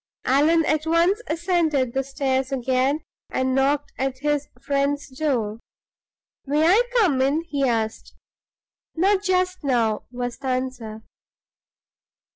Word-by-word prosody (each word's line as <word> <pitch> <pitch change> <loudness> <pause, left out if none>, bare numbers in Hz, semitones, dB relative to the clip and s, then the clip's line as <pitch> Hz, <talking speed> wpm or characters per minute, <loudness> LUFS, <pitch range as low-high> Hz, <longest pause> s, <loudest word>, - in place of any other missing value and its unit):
Allan 310 +5 +3
at 310 +1 0
once 340 +7 +3
ascended 320 -7 0
the 270 - 0
stairs 265 -1 -1
again, 265 +3 0 0.3
and 260 0 0
knocked 280 +2 +1
at 265 0 -1
his 295 +1 -1
friend's 280 +1 -1
door. 255 -6 -2 0.9
"May 300 +3 +2
I 385 +7 +6 0.2
come 330 - +3
in?" 285 +5 +1
he 285 -5 -1
asked. 225 -2 -2 0.8
"Not 385 +4 +2
just 370 -2 0
now," 230 -6 +1
was 245 0 -4
the 275 - -6
answer. 255 -4 -3
275 Hz, 120 wpm, -23 LUFS, 260-320 Hz, 0.9 s, I